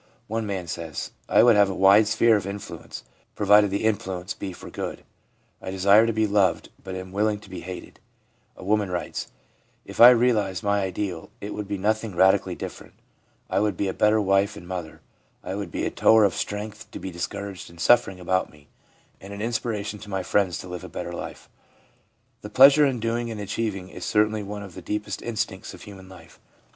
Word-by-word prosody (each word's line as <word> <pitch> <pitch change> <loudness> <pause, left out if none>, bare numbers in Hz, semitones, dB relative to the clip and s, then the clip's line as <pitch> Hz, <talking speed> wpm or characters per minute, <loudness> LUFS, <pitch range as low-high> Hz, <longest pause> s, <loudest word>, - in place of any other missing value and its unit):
One 110 0 -3
man 95 -3 -3
says: 80 -2 -5
' - - -39
I - - +6
would 120 -2 +6
have 100 -1 +5
a 95 - -3
wide 100 +3 +6
sphere 110 +1 +4
of 100 -2 -2
influence, 100 0 -8 0.3
provided 105 0 +5
the 100 +2 -2
influ 95 -4 -1
ence 90 +5 -5
be 95 - -6
for 90 - -11
good; - - -5 0.6
I - - -6
desire 100 +4 +5
to - - +1
be 110 0 +1
loved, 100 -4 +1
but 95 -1 -6
am 95 0 -7
willing 105 +1 0
to 100 - -15
be 90 - -6
hated/ 90 +1 -9 0.6
A - - -10
woman 105 0 +1
writes: 90 -1 -4 0.3
' - - -40
If - - -2
I 120 - +12
realised 115 -6 +2
my 100 0 +1
ideal, 95 -2 -4
it 105 +1 -6
would 105 -1 -5
be 100 0 -3
nothing 110 0 -1
radically 95 +2 +3
different; - - -9 0.5
I - - 0
would 105 0 0
be 100 - -1
a 95 - -2
better 105 +1 +3
wife 100 0 +1
and 85 - -11
mother, 90 -3 -6 0.4
I 95 - -5
would 100 -2 -4
be - - -3
a - - -1
tower 110 -1 +5
of 100 -3 +3
strength 105 +2 -5
to - - -8
the 95 - -6
discouraged 95 +3 -6
and 85 0 -16
suffering 95 -1 +3
about 95 +1 0
me, 75 -1 -21 0.5
and 95 - -10
an 100 - -7
inspiration 110 -3 -3
to 105 - -11
my 95 -2 -2
friends 95 -3 +1
to - - -10
live 90 -1 -7
a - - -8
better - - -6
life/ - - -8 0.9
The 105 - -8
pleasure 140 +6 +7
in 130 -3 -2
doing 115 +1 -2
and 110 -2 -6
achieving 100 -2 -3
is - - -9
certainly 105 0 +1
one 105 0 -6
of 95 -3 -11
the 95 - -9
deepest 105 +4 -4
instincts 110 -5 -4
of - - -14
human 95 -2 -12
life. 90 -4 -15
100 Hz, 210 wpm, -25 LUFS, 95-110 Hz, 0.9 s, I